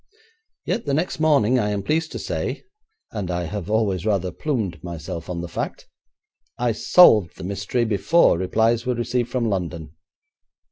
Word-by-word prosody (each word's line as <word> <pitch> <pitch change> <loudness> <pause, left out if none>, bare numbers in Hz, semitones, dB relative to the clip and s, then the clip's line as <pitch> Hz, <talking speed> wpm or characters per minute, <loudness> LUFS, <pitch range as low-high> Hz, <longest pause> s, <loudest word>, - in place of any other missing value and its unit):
Yet 225 - -2
the 140 - +1
next 160 +2 -2
morning, 140 -6 +3
I 105 - 0
am 100 -1 -2
pleased 160 +6 0
to - - -4
say, - - -3 0.5
and 100 -5 -4
I 90 0 -1
have 95 +3 -5
always 105 -5 +1
rather 95 -4 0
plumed 110 - -3
myself 85 0 -6
on 85 -1 -3
the 85 - -5
fact, - - -5 0.7
I 120 -1 +1
solved 110 - +5
the - - -8
mystery 100 +5 -1
before 110 - +3
replies 110 +5 +1
were 125 0 -1
received 120 0 -1
from 120 -3 -1
London. 85 -6 -3
105 Hz, 160 wpm, -22 LUFS, 90-120 Hz, 0.7 s, solved